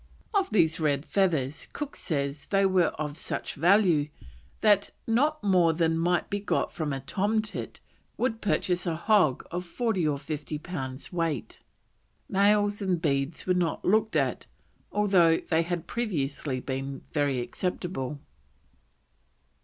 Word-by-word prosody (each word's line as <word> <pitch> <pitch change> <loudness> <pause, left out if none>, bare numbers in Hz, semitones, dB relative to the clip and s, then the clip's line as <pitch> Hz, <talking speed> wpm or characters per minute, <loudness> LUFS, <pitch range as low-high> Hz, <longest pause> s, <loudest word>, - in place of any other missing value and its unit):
Of 390 -2 +2
these 165 -4 +3
red 145 -2 +1
feathers 155 -8 0
Cook 295 -1 -5
says 140 -3 -3
they 195 -1 +3
were 185 -3 +3
of 150 -1 -3
such - - -4
value 170 -2 +4 0.5
that 205 -2 +4 0.2
"not 295 +7 +1
more 180 -5 +4
than 165 0 +1
might 175 +2 +1
be 205 - -2
got 200 - -1
from 155 -3 -3
a 135 -1 -3
tomtit, 210 +8 -2 0.4
would 230 -3 -1
purchase 180 -3 0
a 165 - 0
hog 170 - +3
of 175 +1 -3
40 190 -2 -1
or 145 -2 0
50 150 +1 -5
pounds 135 -3 -6
weight." 165 -3 -2 0.7
Nails 205 +1 +3
and 185 -3 0
beads 140 -1 -1
were 185 - +3
not 175 -2 -1
looked 215 +3 +2
at, - - 0 0.4
although 185 -6 +4
they 160 -1 0
had 170 0 -3
previously 145 - -2
been 135 +1 -4
very 145 -4 +1
acceptable. 150 0 -3
170 Hz, 140 wpm, -28 LUFS, 150-200 Hz, 0.7 s, value